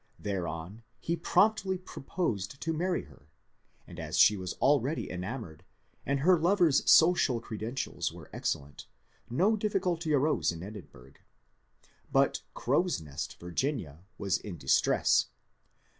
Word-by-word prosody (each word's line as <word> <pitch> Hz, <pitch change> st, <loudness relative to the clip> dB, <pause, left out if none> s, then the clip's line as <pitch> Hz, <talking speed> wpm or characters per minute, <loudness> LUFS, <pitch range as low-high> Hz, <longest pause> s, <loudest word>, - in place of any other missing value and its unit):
Thereon 90 Hz, +1 st, -4 dB, 0.2 s
he 170 Hz, -, -1 dB
promptly 190 Hz, +2 st, +2 dB
proposed 135 Hz, -, -4 dB
to 165 Hz, -, -2 dB
marry 175 Hz, +3 st, -1 dB
her; 70 Hz, -, -19 dB, 0.6 s
and -, -, -11 dB
as -, -, -3 dB
she 105 Hz, -, +7 dB
was 90 Hz, -2 st, -4 dB
already 140 Hz, +2 st, +1 dB
enamoured, 90 Hz, -, -6 dB, 0.4 s
and 140 Hz, 0 st, 0 dB
her 180 Hz, +3 st, +5 dB
lover's 170 Hz, -4 st, +3 dB
social 160 Hz, -7 st, +5 dB
credentials 115 Hz, +3 st, -4 dB
were -, -, -12 dB
excellent, 70 Hz, +1 st, -4 dB, 0.4 s
no 190 Hz, -, +3 dB
difficulty 185 Hz, -6 st, -1 dB
arose 150 Hz, -, +2 dB
in 85 Hz, 0 st, -8 dB
Edinburgh. 100 Hz, -, -11 dB, 1.0 s
But -, -, +2 dB
" -, -, -42 dB
Crow's 155 Hz, -, +1 dB
Nest," 75 Hz, -2 st, -7 dB
Vir 90 Hz, 0 st, -8 dB
ginia, 90 Hz, -, -2 dB, 0.2 s
was 100 Hz, -2 st, 0 dB
in 95 Hz, -5 st, -8 dB
distress. 65 Hz, -, +3 dB
130 Hz, 130 wpm, -30 LUFS, -, 1.0 s, she